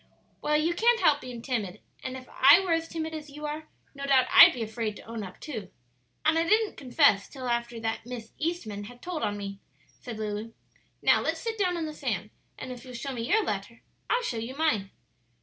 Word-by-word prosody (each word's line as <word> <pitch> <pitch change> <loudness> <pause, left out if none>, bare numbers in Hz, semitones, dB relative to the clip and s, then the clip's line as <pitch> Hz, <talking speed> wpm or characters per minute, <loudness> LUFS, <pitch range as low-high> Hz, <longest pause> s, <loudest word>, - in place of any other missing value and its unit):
"Well, 300 0 +2
you 330 +3 +1
can't 465 +6 +4
help 290 -7 +4
being 245 -2 -8
timid; 225 -8 -2 0.2
and 260 0 -4
if 255 -1 -11
I 280 +6 +7
were 375 -3 -2
as 330 0 +1
timid 320 -1 -4
as 305 -1 -6
you 300 +2 -8
are, 305 +1 -5 0.3
no 280 -1 -8
doubt 265 -2 +5
I'd - - +10
be 240 - -4
afraid 220 -1 -3
to - - -11
own 230 0 -6
up 185 -2 -8
too; 220 -11 -6 0.6
and 320 +1 +4
I - - +3
didn't 430 +5 +2
confess 255 -6 +3
till 260 -3 -7
after 235 -1 -1
that 225 0 -2
Miss 235 -2 -8
Eastman 230 -12 -3
had 245 +3 -13
told 350 -3 -4
on 205 0 -1
me," 200 -1 -6 0.4
said 235 -3 -7
Lulu. 215 +1 -4 0.5
"Now - - +5
let's - - -1
sit 455 -1 -3
down 360 -3 +1
on 330 - -2
the 310 - -5
sand, - - -3 0.3
and 255 - -6
if 250 -1 -8
you'll 255 -1 -10
show 270 +3 -4
me 235 -1 -4
your 435 +1 +4
letter, - - -4 0.3
I'll 485 +1 +2
show 240 - -2
you 230 +4 -5
mine." 220 -12 +1
255 Hz, 220 wpm, -28 LUFS, 225-315 Hz, 0.6 s, I'd